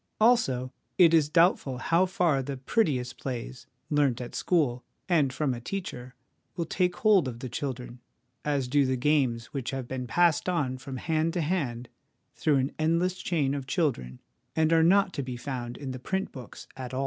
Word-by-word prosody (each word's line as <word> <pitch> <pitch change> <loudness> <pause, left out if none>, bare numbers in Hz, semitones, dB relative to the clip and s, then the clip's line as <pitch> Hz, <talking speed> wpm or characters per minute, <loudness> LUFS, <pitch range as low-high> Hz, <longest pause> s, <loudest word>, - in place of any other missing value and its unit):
Also, 135 - +3 0.2
it 170 -2 +6
is 155 -3 +4
doubtful 165 -6 +3
how 170 +8 +2
far 175 -7 +1
the 135 +1 -5
prettiest 130 - 0
plays, 125 -1 -6 0.2
learnt 145 -5 +2
at 120 -1 -7
school 140 -9 +1 0.2
and 155 -7 +3
from 140 0 -1
a 120 - -6
teacher, 125 -6 -6 0.4
will 170 - -2
take 180 +2 0
hold 200 -6 +4
of 120 -2 -6
the 130 - -5
children 125 -1 -5 0.4
as 140 -3 0
do 140 +3 +3
the 130 -1 0
games 130 -4 +1
which 135 -4 -3
have 135 -2 -4
been 130 -1 -4
passed 170 +5 +2
on 145 -8 0
from 130 0 -7
hand 160 +3 0
to 175 - 0
hand 140 -8 -2 0.5
through 150 - +1
an 135 +1 0
endless 170 +4 +1
chain 145 -6 0
of 140 -2 -4
children, 125 - -1 0.4
and 160 0 +3
are 165 - +5
not 190 +3 +4
to - - -2
be 125 -2 -5
found 120 -2 -5
in 135 -2 -5
the 130 - -6
print 190 +9 -2
books 130 -3 -10
at 130 -1 -6
all. - - -1
140 Hz, 185 wpm, -28 LUFS, 125-165 Hz, 0.5 s, it